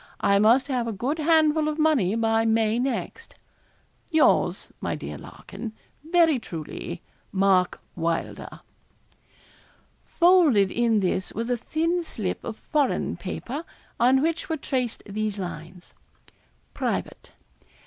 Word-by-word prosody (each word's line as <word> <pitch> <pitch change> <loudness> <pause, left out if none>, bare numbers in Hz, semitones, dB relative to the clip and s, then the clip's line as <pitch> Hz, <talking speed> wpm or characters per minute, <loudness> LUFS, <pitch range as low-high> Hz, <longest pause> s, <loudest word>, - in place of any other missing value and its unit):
I 200 0 +4
must 235 +6 +4
have 250 -4 -1
a - - -1
good 265 +10 -2
handful 310 -1 +3
of 305 0 -2
money 290 - +2
by 225 0 +2
May 225 0 +2
next. 270 - -3 0.7
'Yours, 320 -3 +2
my - - -2
dear - - -7
Larkin, 225 -2 -9 0.3
'Very 325 -3 +3
truly, 170 -1 -7 0.3
'MARK 190 -2 +2 0.2
WYLDER.' 165 -1 -3 1.4
Folded 325 - +4
in 230 -3 +2
this 185 0 -1
was 230 +2 -3
a - - +3
thin 330 +8 -1
slip 210 - -4
of 220 -2 -6
foreign 295 -4 0
paper, 285 +7 -5 0.4
on 260 +3 +4
which 330 +1 -1
were 320 - -1
traced 250 -4 -2
these 210 0 -3
lines: 175 -1 -8 0.8
'_Private. - - -4
235 Hz, 120 wpm, -25 LUFS, 200-305 Hz, 1.4 s, I